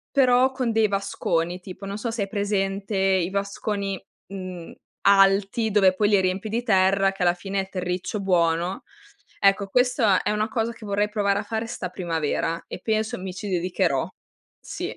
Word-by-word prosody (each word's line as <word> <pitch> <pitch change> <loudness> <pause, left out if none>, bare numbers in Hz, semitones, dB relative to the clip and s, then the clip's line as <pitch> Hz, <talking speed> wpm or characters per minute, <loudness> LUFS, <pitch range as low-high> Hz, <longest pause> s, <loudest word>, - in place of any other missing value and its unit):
però 255 -1 +4
con 255 -3 -1
dei 220 -1 +3
vasconi, 185 -3 -1
tipo, 185 +2 -9
non 200 +1 -4
so 230 +2 -3
se 225 -2 -2
hai 200 - -3
presente 200 0 -1
i 190 -2 +2
vasconi, 200 0 -3 0.3
uhm, 185 -3 -7 0.3
alti 195 +3 +4
dove 195 -3 +4
poi 205 +2 +2
li 205 -2 +4
riempi 185 +3 -1
di 230 +3 -2
terra, 195 -2 +3
che 195 -1 -6
alla 175 -1 +4
fine 195 +2 -3
è 190 - -5
terriccio 185 +2 -3
buono. 180 +3 +1 0.6
Ecco, 195 0 +4
questa 245 -3 +3
è - - -1
una 210 +1 0
cosa 225 0 -1
che 230 -2 -12
vorrei 205 +1 0
provare 200 -2 +1
a - - -3
fare 225 0 -3
'sta 185 -5 -5
primavera 165 -2 -2
e - - -8
penso 220 0 -1
mi 185 -1 -5
ci 205 +2 -6
dedicherò. 180 -5 0 0.5
Sì. - - -5
195 Hz, 175 wpm, -24 LUFS, 185-215 Hz, 0.6 s, però